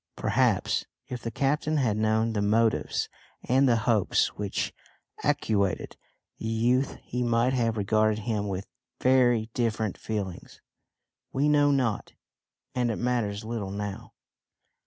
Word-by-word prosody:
Perhaps - - +1 0.2
if 125 -2 -5
the 115 - -3
captain 150 +5 0
had 120 -7 +2
known 110 +1 +1
the 105 - 0
motives 110 +2 +1 0.4
and 130 +1 +4
the 120 - +5
hopes 110 -6 +3
which 100 -1 -3 0.5
actuated 100 -3 0 0.4
the 110 - -4
youth 120 +4 +1
he 125 - -3
might 120 +1 +2
have 115 -3 +1
regarded 110 +1 +2
him 105 -3 -1
with 95 0 -3 0.3
very 120 -3 +3
different 110 -4 -1
feelings! 100 -5 -5 0.7
We 140 +3 +1
know 145 -1 +4
not 125 -7 0 0.6
and 125 -1 +1
it 115 - 0
matters 115 -4 -1
little 110 -4 -3
now. 100 0 -5
115 Hz, 130 wpm, -27 LUFS, 105-125 Hz, 0.7 s, the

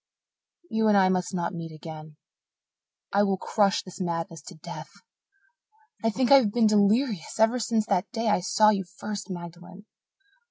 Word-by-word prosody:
You 220 0 +1
and 210 -1 +5
I 190 -1 +4
must 185 -1 -1
not 180 -3 -2
meet 165 -2 -6
again. 155 -1 -10 1.0
I 200 - +4
will 195 -2 +1
crush 200 0 +1
this 190 +1 -10
madness 165 -2 -3
to 180 - -9
death. 155 - -9 1.1
I 225 - +3
think 245 +3 0
I 275 - +10
have 225 -7 +2
been 235 +1 +2
delirious 210 - +1
ever 225 +3 +3
since 225 -1 0
that 180 -1 -1
day 225 0 -2
I 210 - +3
saw 215 +4 +4
you 195 -2 -1
first, 205 -1 -6
Magdalen. 175 +2 -9
200 Hz, 165 wpm, -26 LUFS, 175-220 Hz, 1.1 s, I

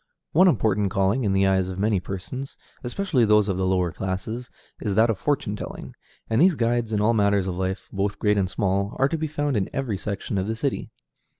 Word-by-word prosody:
One 185 +5 +6
important 105 - +2
calling, 100 +6 +1
in 100 - +2
the 95 0 +3
eyes 95 -1 +2
of 95 - -6
many 105 0 +2
persons, 100 +9 -6 0.3
especially 135 0 0
those 105 -1 +4
of 95 -3 -1
the 95 0 0
lower 90 -2 +1
classes, 95 +8 -4 0.3
is 100 -3 -1
that 115 +2 +4
of 100 - -4
fortune 125 -6 -1
telling; - - -7 0.3
and 115 +4 +2
these 180 -1 +5
guides 120 -2 0
in 105 - +1
all 110 +3 +3
matters 100 -3 +2
of 95 - -2
life, 95 +2 -3
both 100 0 -1
great 105 -1 +2
and 95 -2 0
small, 100 +1 -1
are 135 - +3
to 165 - -2
be 155 - -1
found 145 -4 -1
in 95 - -1
every 120 -8 -2
section 100 -1 -3
of 95 - -2
the 110 - -1
city. 135 +4 -2
105 Hz, 220 wpm, -24 LUFS, 95-120 Hz, 0.3 s, One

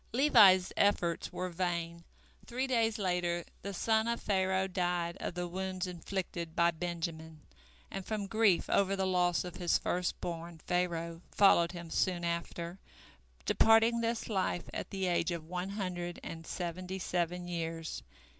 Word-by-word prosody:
Levi's 215 -9 +6
efforts 175 -4 +2
were 185 0 -3
vain, 170 -1 -2 0.4
three 255 +2 -1
days 230 -3 +1
later 175 -3 0 0.2
the 200 - -4
son 220 +3 +1
of 235 0 0
Pharaoh 190 -1 +1
died 175 -2 -1
of - - -4
the 180 0 -2
wounds 185 +1 -3
inflicted 175 -2 -4
by 170 0 +4
Benjamin, 160 -2 -5 0.5
and 195 - -4
from 210 0 -3
grief 210 -3 +3
over 195 0 +2
the 190 -1 0
loss 180 -2 +2
of 180 -1 -7
his 175 -2 +2
first 180 0 -1
born 170 -1 -5
Pharaoh 170 -2 -1
followed 175 -4 +5
him 170 -2 -8
soon 175 -1 +1
after, 170 +1 -3 0.7
departing 225 +1 +5
this 230 0 -1
life 190 -4 -1
at - - -4
the 190 -1 -2
age 175 -1 +1
of 170 -3 -4
one 180 +3 -4
hundred 180 -3 -4
and 165 0 -7
seventy 180 +1 -4
seven 180 -1 -2
years. 165 -2 -4
180 Hz, 150 wpm, -32 LUFS, 170-195 Hz, 0.7 s, Levi's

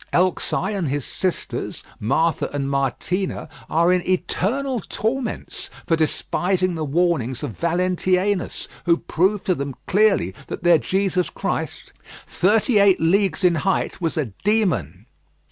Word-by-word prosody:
Elxai 185 +2 +1
and 195 -6 -1
his 145 -1 -2
sisters, 185 -2 -3 0.2
Martha 150 +9 +1
and 140 -1 -2
Martena, 140 +8 -1 0.2
are 170 +2 +3
in 180 - +2
eternal 235 +8 0
torments 235 +6 -3 0.2
for 165 - +3
despising 180 +3 0
the 160 -2 -3
warnings 145 -5 0
of - - -3
Valentianus, 180 +2 0 0.2
who 170 -1 +5
proved 190 +6 0
to 185 - +3
them 140 -4 -4
clearly 200 - +3
that - - -6
their 175 -2 +6
Jesus 190 0 0
Christ, - - -4 0.3
thirty 210 +4 +2
eight 200 -2 +5
leagues 190 +2 +2
in 180 -1 +5
height, 190 -1 -1
was 165 -2 -1
a 130 -10 -2
demon. 205 - 0
180 Hz, 130 wpm, -22 LUFS, 160-195 Hz, 0.3 s, their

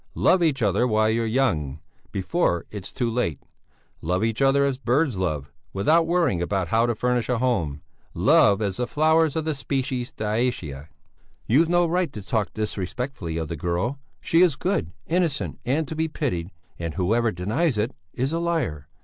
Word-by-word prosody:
Love 185 - +4
each 150 -7 +2
other 105 +5 +2
while 110 -1 +2
you're 115 0 0
young, 80 - 0 0.3
before 95 - 0
it's 105 -3 -7
too 120 - -1
late; 115 - -1 0.6
love 90 +5 0
each 115 +2 -1
other 135 +1 +4
as 135 -2 -1
birds 130 +2 +1
love, 75 -7 -2 0.2
without 160 +12 +3
worrying 170 - +2
about 95 0 -1
how 115 +2 +3
to 120 - 0
furnish 125 0 0
a 125 - +2
home; 85 - 0 0.3
love 110 - +4
as 100 -2 -2
the 125 - -1
flowers 160 +1 +3
of 160 -1 -1
the 160 - 0
species 130 -3 -2
Dioecia." 105 - -2 0.6
"You've 155 +8 +3
no 175 0 +4
right 175 +1 0
to 105 - -7
talk 105 -3 -1
disrespectfully 105 - -3
of 80 -2 -2
the 85 - -4
girl. 90 - -2 0.2
She 165 - +2
is 175 -6 +5
good, 150 - -1
innocent, 170 -4 -1
and 145 +5 0
to 160 - -5
be 160 +1 0
pitied, 90 - -2 0.3
and 85 -2 -4
whoever 110 +5 +1
denies 110 - 0
it 110 +5 0 0.2
is 135 +5 -2
a 165 - 0
liar. 145 - -1
120 Hz, 175 wpm, -24 LUFS, 95-145 Hz, 0.6 s, is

